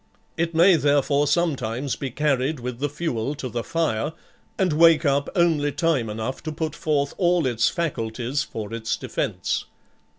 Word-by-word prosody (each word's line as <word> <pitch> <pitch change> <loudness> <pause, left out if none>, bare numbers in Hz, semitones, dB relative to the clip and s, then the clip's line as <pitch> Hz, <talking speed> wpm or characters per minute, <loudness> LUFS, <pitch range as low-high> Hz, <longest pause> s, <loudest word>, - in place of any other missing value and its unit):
It 165 0 -1
may 175 +2 +6
therefore 145 0 +2
sometimes 140 -5 0
be 135 - -4
carried 140 +1 0
with 125 0 -5
the 145 +1 -1
fuel 145 -3 -2
to 135 - -5
the 120 -1 -3
fire, 160 -3 -1 0.4
and 185 -5 +1
wake 165 +1 +5
up 140 0 +2
only 160 -5 +2
time 150 -8 0
enough 110 +5 -4
to 155 - -4
put 155 +1 -3
forth 145 -2 0
all 175 -3 +3
its 120 -3 +2
faculties 125 -4 -2
for 110 -4 -6
its 115 -1 -2
defence. - - -2
145 Hz, 160 wpm, -24 LUFS, 125-160 Hz, 0.4 s, may